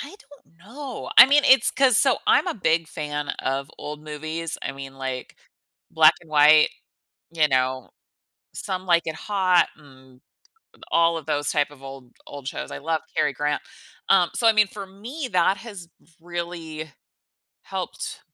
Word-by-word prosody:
I 290 +7 -9
don't 275 - -21
know, 250 +8 -8
I - - +12
mean, 290 +1 +4
it's 260 -3 +5
'cause 260 -5 +3
so - - +3
I'm - - +4
a 355 - -2
big 165 -5 +1
fan 150 -2 -5
of 135 +2 -3
old 150 0 -7
movies, 155 +2 -5
I - - -3
mean, 135 0 -9
like, 130 -1 -6 0.5
black 160 0 +6
and 165 - -19
white, 150 0 +6 0.6
you 160 -2 +2
know, 130 -1 -1 0.6
Some 185 -1 -5
Like 170 -1 +3
It 160 - -4
Hot, 185 -4 +2
and 130 -3 -19 0.7
all 170 0 +3
of 155 - -12
those 145 0 -1
type 145 0 0
of 140 -2 -17
old 135 -2 -11
old 140 -2 -8
shows. - - -6
I - - -6
love 160 +1 -2
Cary 145 - +1
Grant, 150 +2 -2 0.5
um, 180 -3 +4
so, 235 - 0
I 225 - +7
mean, 215 -1 +4
for 200 0 -8
me, 240 +10 -7
that 185 +2 +2
has 195 -6 -10 0.3
really 170 -2 -6 0.7
helped - - -6
160 Hz, 165 wpm, -23 LUFS, 145-195 Hz, 0.7 s, I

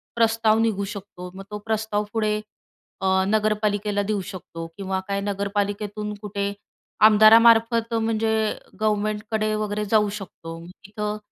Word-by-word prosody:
प्रस्ताव 225 -1 +3
निघू 215 -3 +1
शकतो. 195 -3 -8
मग 195 - -8
तो 210 - -3
प्रस्ताव 220 -1 -1
पुढे 215 -2 +1 0.7
अ, 190 - 0 0.2
नगरपालिकेला 210 -1 +1
देऊ 205 -1 -1
शकतो 165 -3 -8
किंवा 190 -1 -2
काय 200 0 -1
नगरपालिकेतून 205 +1 -2
कुठे 200 -1 -3 0.6
आमदारामार्फत 230 +1 +6
म्हणजे 225 0 0 0.5
गव्हर्नमेंटकडे 215 0 0
वैगरे 210 0 -2
जाऊ 210 -2 +4
शकतो. 165 -3 -9
तिथं 210 +3 -5
210 Hz, 115 wpm, -24 LUFS, 200-220 Hz, 0.7 s, आमदारामार्फत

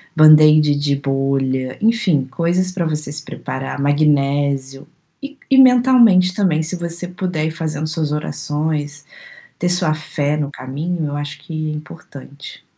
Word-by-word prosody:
Band-Aid 155 -1 +6
de 145 0 0
bolha, 135 -1 -2
enfim, 215 - +1
coisas 175 +5 -1
pra 175 -3 -2
você 150 -2 -2
se 150 0 -5
preparar, 135 -1 -6
magnésio, 140 -2 0 0.4
e 285 0 -8
e 265 - +4
mentalmente 240 -8 +5
também 180 -6 +1
se 165 +4 -3
você 170 0 -5
puder 180 -4 -3
ir 160 - -2
fazendo 155 -2 -4
suas 155 -1 -2
orações, 150 -1 -3 0.5
ter 175 - 0
sua 175 -3 +1
fé 150 -1 -2
no 145 -2 -2
caminho, 150 +3 -4
acho 145 0 -6
que 160 - -10 0.2
importante. 145 -2 -11
155 Hz, 135 wpm, -18 LUFS, 145-175 Hz, 0.5 s, Band-Aid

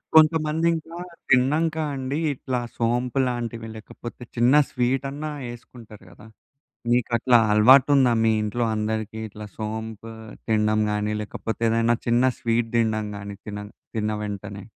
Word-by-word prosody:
కొంతమంది 155 0 +4
ఇంకా 165 +1 -6 0.3
తిన్నాంక 150 +6 +3 0.2
అండి, 135 +1 -3 0.2
ఇట్లా 130 -1 -3 0.2
సోంపు 120 +3 0
లాంటివి 115 -2 -4
లేకపోతే 120 +2 -9
చిన్న 120 +2 +4 0.2
స్వీటాన్నా 135 +4 -1 0.2
వేసుకుంటారు 120 -3 -11
కదా! 105 +5 -15 0.6
మీకు 120 -1 +2
అట్లా 120 +1 +4
అలవాటు 130 +7 +7
ఉందా? 130 -3 +4
మీ 110 - +4
ఇంట్లో 120 +3 -1
అందరికి 110 0 -3
ఇట్లా 105 +1 -9
సోంపు 110 0 -5 0.4
తినడం 110 -1 +2
గాని, 105 0 -1
లేకపోతే 110 +2 -5
ఏదైనా 115 +1 +2
చిన్న 120 +1 +3 0.2
స్వీట్ 115 0 0
తినడం 110 -2 +1
గాని 100 0 -7
తిన 105 0 -6 0.3
తిన్న 110 -1 0
వెంటనే. 100 -1 -6
115 Hz, 130 wpm, -24 LUFS, 110-130 Hz, 0.6 s, అలవాటు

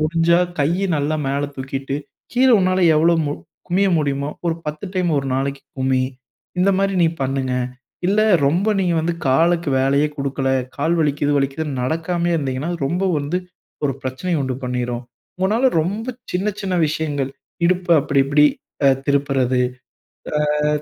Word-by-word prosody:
முடிஞ்சா, 165 +2 +3 0.2
கையை 175 +7 +1
நல்லா 150 +2 0
மேலே 140 +1 0
தூக்கிட்டு, 135 +1 -4 0.4
கீழே 255 +1 +4
உன்னால 185 0 +2 0.2
எவ்வளோ 165 +2 +4
மு 145 - -1 0.4
குனிய 190 +3 +2
முடியுமோ 140 -1 -1 0.2
ஒரு 165 - +1
பத்து 150 +3 -4
டைம் 180 -2 +1
ஒரு 135 -1 -3
நாளைக்கு 135 +1 -2 0.2
குனி." 130 0 +2 0.6
இந்த 195 - +4
மாரி 195 0 +1
நீ 165 - +5
பண்ணுங்க. 130 -1 -1 0.5
இல்ல, 205 +3 +3 0.3
ரொம்ப 175 +8 +1
நீங்க 180 -3 +1
வந்து 170 +2 0
காலுக்கு 165 +5 +3
வேலையே 140 +2 +3
குடுக்கல, 135 -1 -2 0.3
கால் 160 +4 +1
வலிக்குது 145 -1 +1
வலிக்கிதுன்னு 140 0 -1
நடக்காமயே 170 +5 0
இருந்தீங்கன்னால், 140 +4 -2
ரொம்ப 180 +6 -1
வந்து 145 +5 -2 0.5
ஒரு 140 - +1
பிரச்சனைய 150 +5 -2
உண்டு 130 -1 -2
பண்ணிரும். 125 -1 -2 0.4
உங்கனால 215 +8 +3
ரொம்ப 200 +8 -3 0.3
சின்ன 190 +4 0
சின்ன 190 -2 -2
விஷயங்கள், 145 -3 -2 0.4
இடுப்ப 180 0 0
அப்படி 140 0 +2
இப்படி 145 +2 +4 0.4
அ - - +7 0.2
திருப்புறது. 135 -3 +1 1.1
அ - - +3
150 Hz, 145 wpm, -20 LUFS, 135-175 Hz, 1.1 s, அ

